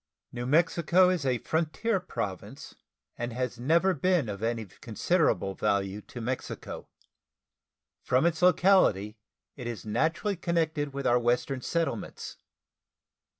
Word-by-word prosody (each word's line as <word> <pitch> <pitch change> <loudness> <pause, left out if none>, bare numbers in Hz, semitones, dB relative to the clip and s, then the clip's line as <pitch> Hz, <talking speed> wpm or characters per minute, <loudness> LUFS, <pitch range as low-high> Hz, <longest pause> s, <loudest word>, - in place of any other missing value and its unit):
New 120 0 -5
Mexico 170 +4 +4
is 165 -7 -1
a 125 -2 +2
frontier 165 - -1
Province, 100 - -6 0.5
and 120 +1 -3
has 125 -1 -3
never 170 +9 +3
been 170 -5 +1
of 100 0 -5
any 115 -1 -1
considerable 110 - 0
value 100 +1 -1
to 120 - -10
Mexico. 125 +2 -5 1.1
From 130 +5 +2
its 170 -1 +1
locality 180 - +4 0.4
it 125 -4 -7
is 115 -5 -6
naturally 160 - 0
connected 160 -4 -1
with 140 0 -5
our 120 +1 +4
Western 125 +2 0
settlements. 165 -9 -3
135 Hz, 120 wpm, -28 LUFS, 115-170 Hz, 1.1 s, Mexico